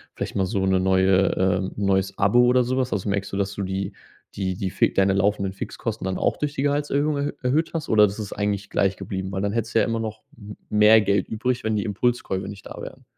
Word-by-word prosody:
vielleicht - - -5
mal 95 - +1
so 95 -1 -1
'ne 95 -1 +2
neue 95 0 +3
ähm, 95 0 +1
'n 100 - -1
neues 95 0 +1
Abo 100 +5 +3
oder 125 +1 +4
so 130 +2 -1
was. 130 -1 0
Also 100 +1 -2
merkst 100 0 -2
du, 100 - -3
dass 100 0 -1
du 100 - -5
die 95 +1 -3 0.4
die 95 -2 -2
die 95 -1 -3
Fix - - +1
deine 95 0 +3
laufenden 100 0 +1
Fixkosten 95 - -5
dann 95 -1 -2
auch - - 0
durch 145 -1 -2
die - - -2
Gehaltserhöhung 145 +1 0
er 140 +1 -2
erhöht 150 +6 +1
hast 160 - -3
oder 105 -1 +6
das 100 - -6
ist 105 -2 -5
eigentlich 100 -1 -2
gleich 95 -1 +1
geblieben, 95 0 -5
weil 95 - -3
dann 100 - -1
hättest 115 0 -3
du - - +6
ja - - +3
immer 115 0 -1
noch 110 -1 -5 0.2
m 105 -2 -10
mehr 105 +1 +6
Geld 100 -1 +1
übrig, 125 +3 -2
wenn 110 0 0
die 105 - 0
Impulskäufe 105 -3 -1
nicht 100 -1 -9
da - - -9
wären. - - -10
100 Hz, 250 wpm, -23 LUFS, 95-115 Hz, 0.4 s, oder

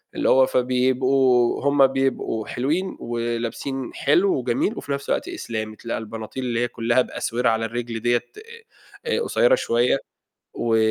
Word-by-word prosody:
اللي - - +1
هو 130 0 +6
فبيبقوا 130 0 +2
هم 140 -1 +5
بيبقوا 135 -4 -1
حلوين، 160 +10 -2
ولابسين 120 +3 -3
حلو 180 +7 +2
وجميل، 125 - 0
وفي 145 - -6
نفس 140 0 -3
الوقت - - 0
إسلامي، 110 - -5
تلاقى 115 +1 -4
البناطيل 110 +3 -6
اللي 120 -2 -1
هي 120 - +1
كُلّها 120 +1 +1
بأسورة 125 0 -1
على 115 0 0
الرِجْل 115 0 -4
دِيَّة 120 +1 +1 0.8
آآ، 470 0 0
قصيّرة - - +3
شوية 120 - +1 0.6
و 115 -1 +1
125 Hz, 145 wpm, -23 LUFS, 115-135 Hz, 0.8 s, هو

